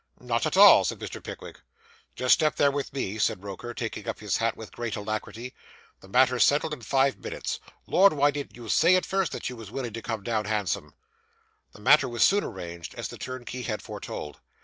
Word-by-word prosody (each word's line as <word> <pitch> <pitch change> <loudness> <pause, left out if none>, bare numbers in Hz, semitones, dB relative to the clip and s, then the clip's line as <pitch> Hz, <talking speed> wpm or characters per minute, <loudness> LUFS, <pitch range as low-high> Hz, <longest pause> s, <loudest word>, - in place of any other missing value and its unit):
'Not - - -1
at - - -2
all,' - - +9
said - - -2
Mr. - - -7
Pickwick. - - -9 0.6
'Just 125 0 +4
step 155 -1 +2
there 140 - +3
with 140 0 -3
me,' 110 -6 -3
said 95 -2 0
Roker, 100 +4 -7
taking 120 0 -5
up 115 - -3
his 105 -4 -1
hat 115 0 0
with 110 - -9
great 120 -2 -4
alacrity; 110 +4 -5 0.5
'the - - -16
matter's 125 +3 +4
settled 150 +2 +2
in 130 - -7
five 135 +3 +1
minutes. - - -4 0.3
Lord! 195 +1 +5
why 145 0 +3
didn't 145 0 -6
you 120 -2 -10
say 170 - +5
at 185 - +1
first 195 -2 0
that - - -4
you 125 - -5
was 115 -4 -10
willing 120 -1 -5
to 115 - -5
come 110 -3 -4
down 110 -1 -1
handsome?' 100 -9 -2 0.8
The 105 - -15
matter 140 +3 +5
was 120 0 +1
soon 200 +2 +4
arranged, 85 -4 -7
as - - -5
the - - -9
turnkey 130 0 -6
had 110 -3 -4
foretold. 75 -1 -7
120 Hz, 210 wpm, -27 LUFS, 105-140 Hz, 0.8 s, all